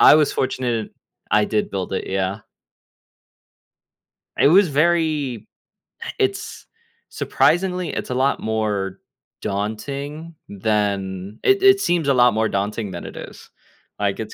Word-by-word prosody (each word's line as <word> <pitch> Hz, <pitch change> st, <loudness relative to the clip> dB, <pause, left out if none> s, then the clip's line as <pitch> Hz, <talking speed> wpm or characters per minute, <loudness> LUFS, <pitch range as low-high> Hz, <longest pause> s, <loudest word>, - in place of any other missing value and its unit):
I -, -, +9 dB
was 150 Hz, -2 st, +3 dB
fortunate 120 Hz, -4 st, -2 dB, 0.4 s
I 105 Hz, +1 st, +4 dB
did 105 Hz, -1 st, -1 dB
build 95 Hz, -1 st, -4 dB
it, -, -, -3 dB
yeah. 95 Hz, +2 st, -1 dB, 2.0 s
It -, -, +6 dB
was 185 Hz, +2 st, +6 dB
very 155 Hz, -, +1 dB, 0.7 s
it's 400 Hz, 0 st, -2 dB, 0.4 s
surprisingly, 180 Hz, 0 st, +1 dB
it's -, -, -4 dB
a 125 Hz, -, -2 dB
lot 135 Hz, +2 st, +1 dB
more 105 Hz, -3 st, -2 dB, 0.4 s
daunting 140 Hz, +11 st, -4 dB
than 100 Hz, -1 st, -2 dB
it 395 Hz, 0 st, +3 dB
it 395 Hz, 0 st, +7 dB
seems 175 Hz, -, +1 dB
a 140 Hz, -, +4 dB
lot 125 Hz, -2 st, +5 dB
more 110 Hz, 0 st, +1 dB
daunting 100 Hz, +1 st, -2 dB
than 85 Hz, -, -7 dB
it -, -, -9 dB
is. -, -, -10 dB, 0.5 s
Like, 100 Hz, 0 st, 0 dB
it's 110 Hz, -, -7 dB
115 Hz, 130 wpm, -21 LUFS, 100-155 Hz, 2.0 s, I